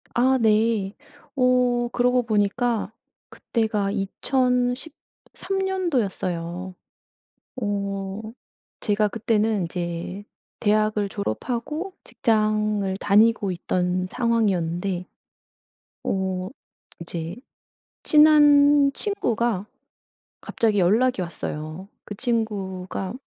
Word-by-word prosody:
아 260 +2 +4
네. 215 -2 +2 0.4
어 250 -2 +2
그러고 250 0 +2
보니까 220 +1 0 0.4
그때가 215 -4 -1
2013 250 - -2
년도였어요. 190 - -2 0.8
어 200 -2 -3 0.6
제가 210 0 +1
그때는 220 -2 0
이제 175 +3 -5 0.4
대학을 215 -1 +2
졸업하고 245 - -4
직장을 215 -3 0
다니고 205 0 +3
있던 180 +1 -1
상황이었는데 185 -6 0 1.0
어 190 -1 -2 0.5
이제 170 0 -5 0.7
친한 290 -2 +6
친구가 235 - -1 0.8
갑자기 215 -3 0
연락이 215 +5 +3
왔어요. 155 +1 -6 0.2
그 205 - -7
친구가 200 -5 -2
215 Hz, 175 characters per minute, -24 LUFS, 190-245 Hz, 1.0 s, 친한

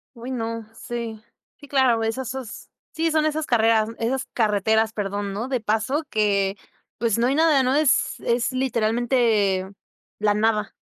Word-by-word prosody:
Oy, 240 +3 -7
no, 230 -2 -4
sí, 230 -2 -6 0.4
sí, 285 - -14
claro, 255 -5 +2
esas 245 +3 -3 0.6
sí, 325 0 0
son 310 -1 +2
esas 310 0 -1
carreras, 225 -2 +3
esas 255 +4 -1
carreteras, 220 0 +2
perdón, 205 -1 -3
¿no? 220 +5 -3
De 260 -2 -1
paso 220 +8 0
que, 200 -2 +1 0.4
pues, 230 -1 0
no 235 - +3
hay 270 - +1
nada, 310 -3 +4
no 260 +2 +1
es 300 -2 +2
es 235 +1 0
literalmente 230 -5 +1 0.5
la 210 0 +2
nada. 215 0 +1
230 Hz, 150 wpm, -23 LUFS, 215-260 Hz, 0.6 s, nada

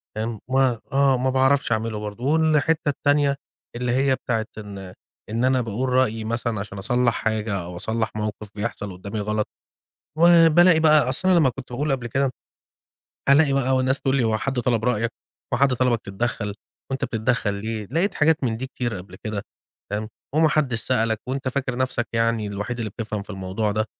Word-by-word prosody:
تمام، 110 0 -3
ما 130 -3 +2
آه 135 -1 +4
ما 130 +1 0
باعرفش 135 0 +2
أعمله 110 -1 -1
برضه 105 +3 -6
والحتّة 155 +1 +2
التانية 145 0 +2 0.4
اللي 125 0 -1
هي 135 +1 +3
بتاعة 115 -3 -2
إن 100 -3 -8 0.4
إن 115 +3 0
أنا 130 0 +3
باقول 120 +3 -2
رأيي 125 -3 +2
مثلًا 115 0 -2
علشان 100 0 -6
أصلَّح 120 +4 +1
حاجة 110 -1 -1
أو 85 +1 -8
أصلَّح 110 +4 -1
موقف 105 0 -4
بيحصل 105 -2 -4
قدامي 100 +4 -6
غلط 105 +1 -1 0.7
و 170 0 +7
بالاقي 175 +1 +6
بقى 155 -5 +5
أصل 185 +8 0
أنا 180 -2 +6
لمّا 145 -5 +4
كنت 125 0 -9
باقول 145 +4 -1
قبل 130 -3 -1
كده 135 +3 0 1.0
ألاقي 140 0 +5
بقى 130 -1 +2
وناس 130 +1 +1
تقول 135 -1 +1
لي: 130 - +2
"هو 110 -1 +1
حد 135 +3 -2
طلب 120 -2 0
رأيَك؟ 115 -1 +1 0.4
هو - - +3
حد 135 -1 +4
طلبَك 125 -2 +1
تتدخَّل؟ 105 +1 -3 0.4
وأنت 135 - -1
بتتدخَّل 110 -1 0
ليه؟" 105 +1 -4
لقيت 175 +7 +1
حاجات 160 0 +3
من 115 -3 0
دي 130 +3 -4
كتيرة 120 -4 -3
قبل 90 +1 -10
كده 105 -2 -3 0.5
تمام، 105 +1 -3 0.3
"وما 160 0 +5
حدش 135 -7 +1
سألَك 115 -4 +1
وأنت 135 +1 -3
فاكر 130 -1 -2
نفْسَك 130 -2 -1
يعني 115 -2 +1
الوحيد 105 +4 -4
اللي 110 -2 -2
بتفْهم 105 -1 -4
في - - -23
الموضوع 95 +2 -2
ده؟" 110 +1 0
120 Hz, 185 wpm, -23 LUFS, 110-135 Hz, 1.0 s, و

